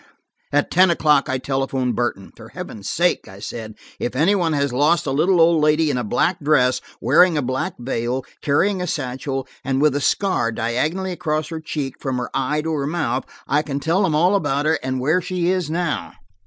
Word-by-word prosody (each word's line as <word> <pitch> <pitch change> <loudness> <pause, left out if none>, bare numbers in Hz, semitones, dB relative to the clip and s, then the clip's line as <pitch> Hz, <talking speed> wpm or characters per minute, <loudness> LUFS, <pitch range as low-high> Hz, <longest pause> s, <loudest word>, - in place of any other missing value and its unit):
At 145 0 +1
ten 185 +1 +5
o'clock 150 -4 +3
I 130 - 0
telephoned 135 -1 -1
Burton: 120 -5 -2
"For - - -12
Heaven's 100 -2 -7
sake," 175 +1 +1
I 95 - -12
said, 110 +1 -7 0.2
"if 120 - -3
anybody 165 +2 +2
has 140 -2 0
lost 150 +6 +2
a 140 - -1
little 170 +6 +2
old 165 -1 +5
lady 150 0 +3
in - - -1
a - - -2
black 125 - 0
dress, 130 -4 +2 0.2
wearing 160 +7 +4
a - - +1
black 130 +1 -2
veil, 125 +1 -2 0.2
carrying 185 +7 +1
a 180 - -2
satchel, 135 -2 -3 0.2
and 135 0 0
with 150 -1 +3
a 145 - 0
scar 185 -8 +1
diagonally 150 +12 -1
across 155 -4 -2
her 165 -1 -5
cheek 145 -4 -4
from 130 -2 -2
her 125 - -4
eye 140 +3 0
to 160 0 -2
her 140 -2 -1
mouth, 150 -5 -1 0.2
I 145 +2 +2
can 140 -2 -4
tell 165 +6 +1
them 170 -6 +1
all 175 +5 +3
about 145 -7 0
her, 160 0 +2
and 130 0 -2
where 155 +8 +2
she 180 -1 -1
is 185 -5 -1
now." 170 -1 -2
145 Hz, 205 wpm, -21 LUFS, 130-170 Hz, 0.2 s, ten